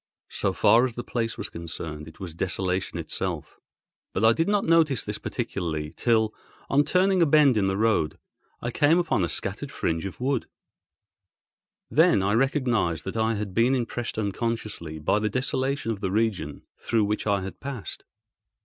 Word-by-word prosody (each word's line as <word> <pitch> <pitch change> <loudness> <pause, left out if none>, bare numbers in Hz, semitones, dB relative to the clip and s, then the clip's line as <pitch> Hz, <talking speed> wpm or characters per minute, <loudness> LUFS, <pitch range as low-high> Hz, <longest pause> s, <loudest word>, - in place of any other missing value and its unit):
So - - 0
far 115 +2 +5
as 125 - -8
the 120 - -4
place 115 -1 -2
was - - -4
concerned, 80 -2 -7
it 80 - -13
was 90 -4 -6
desolation 90 +2 -1
itself. - - -4 0.5
But 105 - +1
I 115 - +7
did 165 +7 0
not 205 -1 +2
notice 160 -7 +3
this 105 0 -4
particularly 85 -10 -3
till, 110 -2 +2 0.4
on 145 +2 +4
turning 185 +3 +3
a 165 - +5
bend 145 -3 +5
in 100 -3 +2
the 95 0 0
road, 110 -8 +1 0.5
I 120 - -1
came 145 +6 +4
upon 170 - +1
a 85 - 0
scattered - - -3
fringe 80 +2 -1
of 95 - -6
wood; 130 0 0 1.4
then 95 - +5
I 100 +2 +2
recognised 120 - +1
that - - -4
I 110 0 +1
had 100 -2 -4
been 120 +6 +3
impressed 120 -2 -3
unconsciously 105 -6 -3
by 80 +7 +1
the 105 0 0
desolation 130 0 -1
of 105 -3 -5
the 95 - -1
region 100 -8 -1 0.2
through 115 -2 +1
which 105 +1 -2
I 100 -1 +2
had 95 - -7
passed. 135 -6 -6
110 Hz, 175 wpm, -26 LUFS, 95-130 Hz, 1.4 s, I